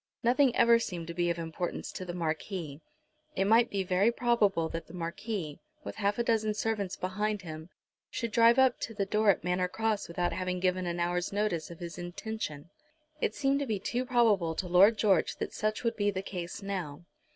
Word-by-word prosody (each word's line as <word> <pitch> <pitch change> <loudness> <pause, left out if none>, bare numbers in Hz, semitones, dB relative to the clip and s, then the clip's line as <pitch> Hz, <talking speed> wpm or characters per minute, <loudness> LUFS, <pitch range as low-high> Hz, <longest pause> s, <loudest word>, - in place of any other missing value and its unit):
Nothing 250 +2 +4
ever 235 0 +6
seemed 175 -7 -4
to - - -4
be 175 0 0
of 170 - -1
importance 165 +1 -4
to 185 - -6
the 175 - -5
Marquis. 160 -2 -3 0.5
It 195 - +1
might 230 +3 +5
be 195 -1 -1
very 190 +5 +3
probable 210 -8 +2
that 165 +1 -6
the 165 - -11
Marquis, 170 -1 -4 0.2
with - - -7
half 205 -1 0
a 235 - +1
dozen 220 -2 +1
servants 205 -4 -1
behind 210 +2 -2
him, 160 0 -8 0.4
should 235 -2 -3
drive 230 +2 +5
up 260 -2 +4
to 225 - -5
the 200 -2 0
door 210 +1 +2
at 195 - +3
Manor 180 +1 +1
Cross 220 +2 -1
without 175 +1 -1
having 185 0 -2
given 185 0 0
an 175 0 -2
hour's 175 +1 0
notice 200 -6 -1
of 170 - -9
his 170 +1 -7
intention. 175 -4 -5 0.5
It - - -1
seemed 275 0 +1
to 285 - -2
be 215 -3 -1
too 240 +6 -2
probable 220 -10 +2
to 180 - -3
Lord 195 +5 +6
George 195 -6 +2
that - - -5
such 215 +2 -2
would 230 - 0
be 205 -1 +2
the 190 -1 -3
case 180 0 -6
now. 175 -5 -5
195 Hz, 205 wpm, -30 LUFS, 175-220 Hz, 0.5 s, ever